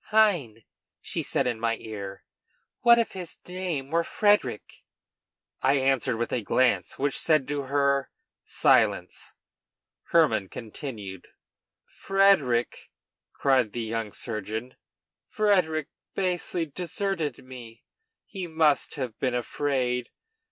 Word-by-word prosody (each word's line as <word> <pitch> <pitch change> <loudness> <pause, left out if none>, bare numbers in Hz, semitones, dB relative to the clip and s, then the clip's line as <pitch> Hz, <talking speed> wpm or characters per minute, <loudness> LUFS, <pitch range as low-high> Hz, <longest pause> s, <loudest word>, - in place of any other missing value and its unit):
"Hein?" 175 - +2 0.4
she - - -3
said - - 0
in 120 -3 -1
my 115 0 +1
ear, 100 -3 -7 0.6
"what 235 0 +7
if 235 - +1
his 180 -3 -7
name 180 -7 -3
were 170 +1 +2
Frederic?" 205 - +1 0.8
I 135 - +4
answered 135 -3 +1
with 120 - -2
a 125 - 0
glance, 105 -3 +1
which 140 +1 0
said 155 -5 +2
to 145 -2 -2
her: 140 0 +1 0.3
"Silence!" - - +2 0.7
Hermann 155 - +3
continued:] 105 - -7 0.6
"Frederic!" 195 -12 +2 0.4
cried 130 -6 +2
the 120 - -3
young 110 -1 -3
surgeon, 110 +3 -5 0.5
"Frederic 180 -8 +1 0.3
basely 180 -2 -1
deserted 165 -3 -3
me. 120 -3 -11 0.4
He 190 -4 -6
must 160 -3 +2
have 125 -6 -5
been 125 -2 0
afraid. 125 -1 -1
135 Hz, 110 wpm, -27 LUFS, 115-170 Hz, 0.8 s, what